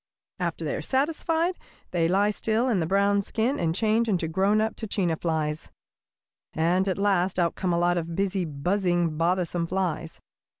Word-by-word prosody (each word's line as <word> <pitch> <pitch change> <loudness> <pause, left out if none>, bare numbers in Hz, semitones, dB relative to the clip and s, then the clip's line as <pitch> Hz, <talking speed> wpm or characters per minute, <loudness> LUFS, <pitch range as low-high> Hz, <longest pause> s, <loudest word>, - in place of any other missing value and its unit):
After - - -2
they - - -1
are - - -4
satisfied 325 +5 0 0.3
they 170 -2 +2
lie 200 +4 +2
still 220 +3 0
in 225 -7 +2
their 160 - -1
brown 200 +2 +3
skins 230 +7 -1
and 165 -1 0
change 225 +2 +1
into 175 -5 0
grown 195 +6 +2
up 220 0 0
tachina 195 -6 -1
flies, 155 -2 -2 0.8
and 175 +4 +1
at 190 - 0
last 195 -2 +1
out 170 -2 +2
come 185 -2 -2
a 170 - +1
lot 175 0 +2
of 165 0 -5
busy, 195 0 0
buzzing, 175 +2 0
bothersome 170 +1 0
flies. 175 -3 -2
185 Hz, 170 wpm, -26 LUFS, 170-210 Hz, 0.8 s, brown